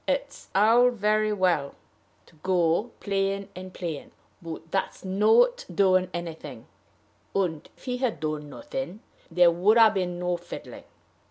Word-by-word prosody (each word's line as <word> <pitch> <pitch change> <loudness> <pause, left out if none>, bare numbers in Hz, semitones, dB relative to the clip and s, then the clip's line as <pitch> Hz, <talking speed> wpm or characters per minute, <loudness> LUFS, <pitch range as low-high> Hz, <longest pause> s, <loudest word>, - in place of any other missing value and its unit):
It's 280 0 -2
all 230 +5 +6
very 215 -2 +1
well 180 -8 +1 0.5
to - - -22
go 175 +5 +1
playing 195 0 -1
and 185 +1 -8
playing, 165 -6 -6 0.3
but 165 -1 -8
that's 195 - -2
not 220 - +3
doing 185 -2 +3
anything; 170 -2 -7 0.7
and, 175 -6 -1
if - - -21
he 250 -1 -2
had 250 -3 -1
done 155 -1 -3
nothing, 265 - -6 0.3
there 175 0 +5
would 190 +7 +3
ha' 225 -2 +7
been 180 -3 -2
no 180 0 -1
fiddling. 175 0 -10
190 Hz, 140 wpm, -26 LUFS, 175-215 Hz, 0.7 s, ha